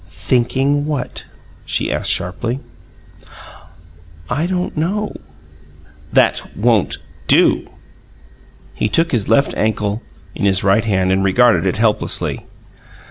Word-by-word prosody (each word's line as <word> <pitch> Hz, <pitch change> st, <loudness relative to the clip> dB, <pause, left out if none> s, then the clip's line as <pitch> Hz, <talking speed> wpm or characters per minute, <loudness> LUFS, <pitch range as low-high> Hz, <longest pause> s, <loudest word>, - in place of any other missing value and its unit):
"Thinking 135 Hz, +4 st, 0 dB
what?" 140 Hz, -5 st, -4 dB, 0.4 s
she -, -, -1 dB
asked -, -, -1 dB
sharply. 115 Hz, +9 st, -1 dB, 1.7 s
"I 150 Hz, +7 st, 0 dB
don't 180 Hz, -1 st, -2 dB
know." 195 Hz, +7 st, -2 dB, 1.0 s
"That -, -, +1 dB
won't 110 Hz, -1 st, +2 dB, 0.3 s
do!" -, -, +4 dB, 1.1 s
He 105 Hz, -, -1 dB
took 165 Hz, +9 st, +1 dB
his 110 Hz, -6 st, 0 dB
left 135 Hz, +5 st, +3 dB
ankle 105 Hz, 0 st, -1 dB, 0.3 s
in -, -, -3 dB
his 95 Hz, -1 st, +2 dB
right 100 Hz, +3 st, +3 dB
hand 95 Hz, -3 st, +1 dB
and 95 Hz, +1 st, +2 dB
regarded 115 Hz, +2 st, +3 dB
it 95 Hz, -, 0 dB
helplessly. 110 Hz, -1 st, 0 dB
115 Hz, 110 wpm, -18 LUFS, 100-140 Hz, 1.7 s, do